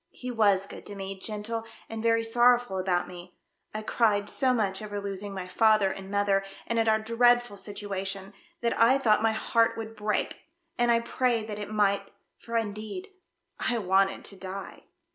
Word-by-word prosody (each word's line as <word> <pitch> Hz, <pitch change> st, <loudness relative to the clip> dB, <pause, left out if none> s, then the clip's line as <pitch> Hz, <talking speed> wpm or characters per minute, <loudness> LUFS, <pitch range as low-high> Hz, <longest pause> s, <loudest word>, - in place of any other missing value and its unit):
He 250 Hz, 0 st, -7 dB
was 205 Hz, -4 st, +3 dB
good -, -, -10 dB
to 205 Hz, -, -7 dB
me, 195 Hz, 0 st, -5 dB
gentle 215 Hz, +3 st, -3 dB, 0.2 s
and 225 Hz, 0 st, -5 dB
very 230 Hz, 0 st, +3 dB
sorrowful 240 Hz, -3 st, +3 dB
about 180 Hz, -1 st, 0 dB
me. 180 Hz, 0 st, -11 dB, 0.3 s
I 215 Hz, 0 st, -5 dB
cried 210 Hz, -3 st, +2 dB
so 260 Hz, -2 st, +3 dB
much 205 Hz, -5 st, 0 dB
over 205 Hz, -1 st, -4 dB
losing 200 Hz, 0 st, -5 dB
my 190 Hz, -2 st, -5 dB
father 215 Hz, 0 st, +4 dB
and 195 Hz, 0 st, -8 dB
mother, 200 Hz, -1 st, +2 dB, 0.2 s
and 230 Hz, 0 st, 0 dB
at 225 Hz, -, +2 dB
our 220 Hz, 0 st, +5 dB
dreadful 240 Hz, 0 st, +3 dB
situation, 195 Hz, -1 st, -5 dB, 0.3 s
that 235 Hz, -1 st, +1 dB
I 235 Hz, +4 st, +6 dB
thought 220 Hz, -6 st, +3 dB
my 225 Hz, 0 st, +2 dB
heart 230 Hz, +1 st, +2 dB
would 225 Hz, 0 st, -6 dB
break, 210 Hz, -1 st, -2 dB, 0.3 s
and 240 Hz, 0 st, +2 dB
I 230 Hz, 0 st, +4 dB
prayed 235 Hz, -2 st, 0 dB
that 210 Hz, 0 st, -4 dB
it 205 Hz, -, -5 dB
might, 200 Hz, -2 st, +1 dB, 0.3 s
for 230 Hz, 0 st, -3 dB
indeed 220 Hz, -, -4 dB, 0.5 s
I 240 Hz, -, 0 dB
v/anted 195 Hz, -1 st, +2 dB
to 200 Hz, -, -5 dB
die." 190 Hz, +1 st, -8 dB
210 Hz, 180 wpm, -28 LUFS, 195-230 Hz, 0.5 s, I